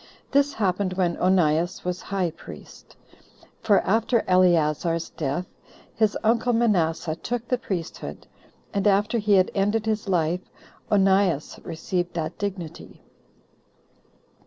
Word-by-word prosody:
This 280 0 +3
happened 190 -2 0
when 180 -2 0
Onias 175 -2 +1
was 180 0 -2
high 190 -4 -1
priest; 165 - -13 0.7
for 205 -3 +4
after 225 +3 +1
Eleazar's 170 -2 +2
death, 145 +7 -2 0.5
his 215 -2 +1
uncle 230 +2 +2
Manasseh 175 -8 +1
took 240 +6 -4
the 250 -1 0
priesthood, 175 -8 -5 0.5
and 200 +1 +1
after 205 +3 +2
he 210 -1 +2
had 185 -1 +4
ended 205 +3 +1
his 215 -2 -1
life, 175 0 +1 0.5
Onias 195 -6 +2
received 175 +2 -3
that 160 -1 -4
dignity. 185 -6 -6
190 Hz, 115 wpm, -24 LUFS, 170-210 Hz, 0.7 s, for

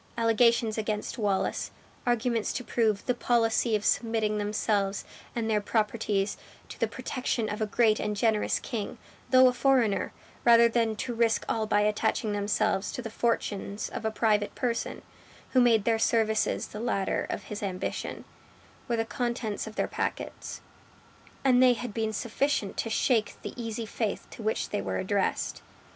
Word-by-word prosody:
Allegations 230 -1 +3
against 210 +1 -3
Wallace; 200 -3 0 0.4
arguments 235 -2 +1
to 250 - -3
prove 220 -4 0
"the 250 - +2
policy 235 -1 +2
of 210 - -2
submitting 220 -2 +1
themselves 205 -1 0 0.3
and 230 -2 -1
their 215 -2 +2
properties 210 -2 0 0.3
to - - -10
the - - +2
protection 250 -3 -2
of 210 +1 -4
a 215 - +1
great 220 0 +3
and 210 0 -1
generous 215 0 +2
king, 225 -6 -4 0.3
though 255 0 +7
a 250 - +3
foreigner, 250 -6 +2 0.3
rather 235 0 +7
than 230 -1 +1
to 240 +3 -3
risk 230 -1 +2
all 220 -1 0
by 205 -1 +3
attaching 210 +1 +1
themselves 205 0 0
to 245 - -5
the 225 - -6
fortunes 210 -3 -1
of - - -6
a 220 - +1
private 215 -1 +1
person, 235 -2 -2 0.5
who 255 - +6
made 230 -4 +4
their 225 -1 +2
services 220 -1 +1
the 210 - -7
ladder 200 -4 -1
of - - -3
his 210 - -6
ambition," 190 -2 -4 0.6
were 235 -2 0
the 225 - 0
contents 235 -3 -2
of 215 - -9
their - - 0
packets; - - -4 0.8
and 255 -1 +5
they 255 -1 +7
had 235 -1 -5
been 220 -1 -1
sufficient 235 0 -1
to 225 - -2
shake 220 -2 +1
the - - -5
easy 230 -1 -4
faith 215 -1 -3
to - - -9
which 220 +1 -1
they 205 - -1
were - - -2
addressed. 195 +1 -1
220 Hz, 165 wpm, -28 LUFS, 210-235 Hz, 0.8 s, though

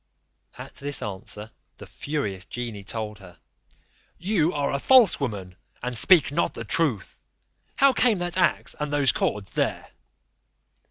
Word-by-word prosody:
At - - -10
this 140 0 -4
answer, 105 +1 -7 0.3
the - - -11
furious 105 -11 -5
genie 115 -5 -6
told 105 0 -6
her, 90 -2 -15 0.8
"You 175 -3 0
are 145 -3 -2
a 140 - -1
false 250 - +5
woman, 100 -9 -5 0.3
and 125 0 -3
speak 155 - +6
not 165 +4 -1
the - - -6
truth; 135 - -1 0.6
how 275 -1 +4
came 235 -5 +4
that 175 0 -3
axe 185 - 0
and 150 -1 -3
those 145 -2 +2
cords 100 -2 -2
there?" - - -2
140 Hz, 145 wpm, -24 LUFS, 105-165 Hz, 0.8 s, speak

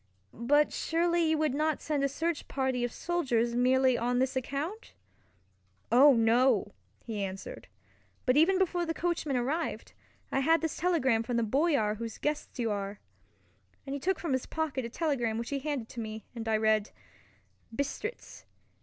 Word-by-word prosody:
"But 290 +6 +2
surely 335 0 +1
you 315 - +2
would 305 -3 +1
not 305 +2 0
send 295 -3 -1
a 275 - +2
search 325 +3 -2
party 265 -2 -1
of 245 - -1
soldiers 245 -10 0
merely 255 +1 +3
on 245 +1 0
this 260 +1 +1
account?" 285 - -4 1.0
"Oh, 270 +4 +8
no!" 235 +3 +3 0.3
he 215 -3 -3
answered, 190 -11 -7 0.6
"but 250 - +3
even 335 +6 +5
before 360 -2 +1
the 330 -1 -2
coachman 325 -5 -1
arrived, 285 +8 -2 0.4
I - - +1
had 325 +3 +3
this 320 -2 -2
telegram 285 -10 +2
from 235 +1 -2
the 235 - +2
Boyar 255 -3 +1
whose 230 -1 -5
guest 295 -1 -3
you 230 -3 0
are," 200 0 -4 0.9
and 275 - -5
he 280 - -3
took 375 +7 0
from 330 -6 -2
his 260 - -1
pocket 305 -6 -2
a - - -5
telegram 240 -6 -1
which 235 +3 -4
he 280 - -1
handed 275 -5 -3
to 240 - -8
me, 220 -1 -6
and 230 -2 -6
I 220 -1 +2
read: 215 -1 +2 0.8
Bistritz. 285 - -5
265 Hz, 170 wpm, -30 LUFS, 235-315 Hz, 1.0 s, Oh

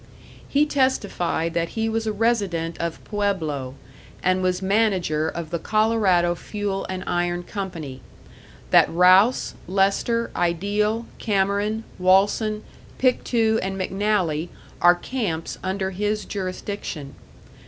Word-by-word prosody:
He 290 +1 +3
testified 205 - 0
that 170 0 0
he 225 0 +1
was 225 0 -1
a - - +1
resident 200 -7 0
of 170 -1 -4
Pueblo, 160 -11 -2 0.5
and 185 0 +2
was 185 -1 +1
manager 190 -6 +1
of 170 -2 -6
the 170 - -1
Colorado 210 -5 +2
Fuel 200 +2 -4
and 185 -1 -4
Iron 175 0 -1
Company; 165 - -6 0.7
that - - +6
Rouse, 185 +7 +5
Lester, 200 +5 +1
Ideal, 205 +6 0
Cameron, 205 +2 0 0.2
Walsen, 205 +3 +3 0.3
Pictou 230 -3 +2
and 195 +1 -3
McNally 185 -5 0 0.3
are 175 0 +7
camps 175 -6 -3
under 190 0 -2
his 210 +2 -1
jurisdiction. 185 -6 -5
195 Hz, 110 wpm, -23 LUFS, 175-215 Hz, 0.7 s, are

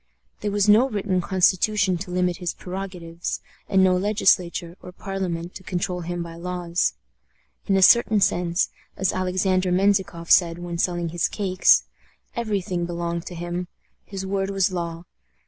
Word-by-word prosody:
There 210 - -2
was 205 0 +1
no 225 +6 +6
written 195 -4 -1
constitution 190 +1 +2
to 190 +1 -7
limit 180 -1 0
his 180 -2 -3
prerogatives, 180 -3 -5 0.3
and 190 -2 +4
no 185 -1 +4
Legislature 180 -3 +1
or 180 - -10
Parliament 180 -3 -4
to - - -10
control 180 -1 -3
him 175 0 -4
by 165 0 -9
laws. 175 0 -1 0.7
In 195 -2 +3
a 190 - +4
certain 220 +1 +6
sense, 175 -2 +1 0.3
as 190 -1 +1
Alexander 185 0 0
Menzikoff 185 -3 +1
said 170 -2 +5
when 175 -1 -5
selling 175 -1 0
his 170 +1 0
cakes, 190 -3 +3 0.5
every 215 -4 -1
thing 175 -1 -3
belonged 170 0 -3
to 175 - -7
him. 175 +1 -4 0.4
His 195 -1 -6
word 195 0 -1
was 195 0 +1
law. 170 -2 -4
180 Hz, 155 wpm, -24 LUFS, 175-195 Hz, 0.7 s, no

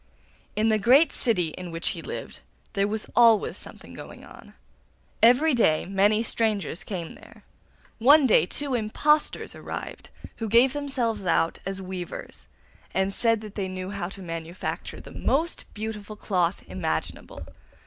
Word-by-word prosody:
In 215 +1 +2
the 215 -1 +3
great 260 +10 +5
city 180 -9 +1
in 180 +2 -8
which 165 +1 +1
he - - -4
lived - - -6 0.3
there 200 0 +1
was 215 +1 -3
always 230 -2 +5
something - - -10
going - - -10
on; - - -14 0.7
every 250 +7 +6
day 160 -10 +3
many 200 +4 +2
strangers 210 -7 -1
came 175 -5 -5
there. - - -16 0.6
One 280 +5 +7
day 180 -8 +4
two 285 +4 -2
impostors 275 +7 +1
arrived - - -7 0.3
who 225 -1 -3
gave 240 +4 +5
themselves 250 -7 -2
out 165 -1 +1
as 195 0 -3
weavers, 185 -1 -6 0.5
and 190 +1 +1
said 230 -1 +2
that 210 -2 -9
they 195 -2 -3
knew 185 0 -5
how 200 -3 -4
to 195 0 -10
manufacture 165 +1 -5
the - - -12
most 320 +5 -1
beautiful 215 -1 -6
cloth 180 -3 -1
imaginable. 90 -4 -4
210 Hz, 150 wpm, -26 LUFS, 185-235 Hz, 0.7 s, One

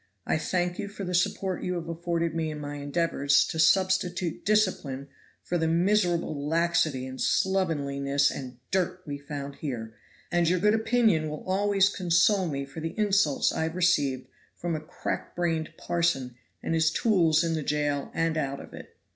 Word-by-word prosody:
I - - +1
thank 175 +2 -1
you 205 - -3
for 200 0 -7
the 180 -1 -3
support 185 +1 0
you 180 - -1
have 170 -1 -4
afforded 170 0 -2
me 165 -1 -1
in 150 -1 -5
my 145 0 -5
endeavors 145 -1 +2
to 160 - -4
substitute 180 0 +2
discipline 170 -10 0 0.3
for 175 - -1
the 160 - +1
miserable 170 -4 +1
laxity 160 -5 +1
and 130 0 -8
slovenliness 140 -7 +1
and 125 -2 -7
dirt 185 -1 0
we 145 -2 -5
found 140 -1 -6
here; 115 -7 -5 0.4
and 175 -1 +2
your 180 - +2
good 210 +4 +3
opinion 220 -8 +2
will 150 0 -6
always 195 +1 +3
console 185 0 +2
me 140 -3 -3
for 135 +4 -9
the 165 +5 -5
insults 200 -8 +2
I - - -2
have 160 +1 -2
received 145 -8 +1 0.3
from 170 -1 -3
a - - -2
crack 155 +3 -5
brained 165 -3 -1
parson 135 -8 0 0.3
and - - -1
his 160 -1 +3
tools 165 -4 +3
in 165 -1 0
the 160 - -1
jail 145 -1 -1
and 165 -1 0
out 140 -2 -2
of - - -12
it." - - -12
165 Hz, 175 wpm, -27 LUFS, 145-180 Hz, 0.4 s, good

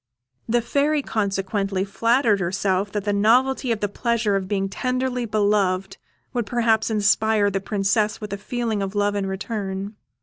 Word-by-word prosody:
The 235 0 +2
Fairy 290 +4 +1
consequently 195 -2 -1
flattered 230 +1 +2
herself 190 +2 0
that 205 -2 -2
the 205 0 0
novelty 250 +5 +3
of 225 - -1
the 205 - +1
pleasure 220 0 0
of 190 -1 -2
being 195 -1 -1
tenderly 255 +3 -2
beloved 200 -3 +1 0.4
would 240 -4 -1
perhaps 225 -2 +2
inspire 215 -1 +2
the 195 0 -2
Princess 210 +1 0
with 210 -2 -6
a - - -3
feeling 230 -1 -2
of 195 +1 -4
love 205 0 +1
in 200 -1 -2
return. 195 0 -4
210 Hz, 160 wpm, -23 LUFS, 195-230 Hz, 0.4 s, novelty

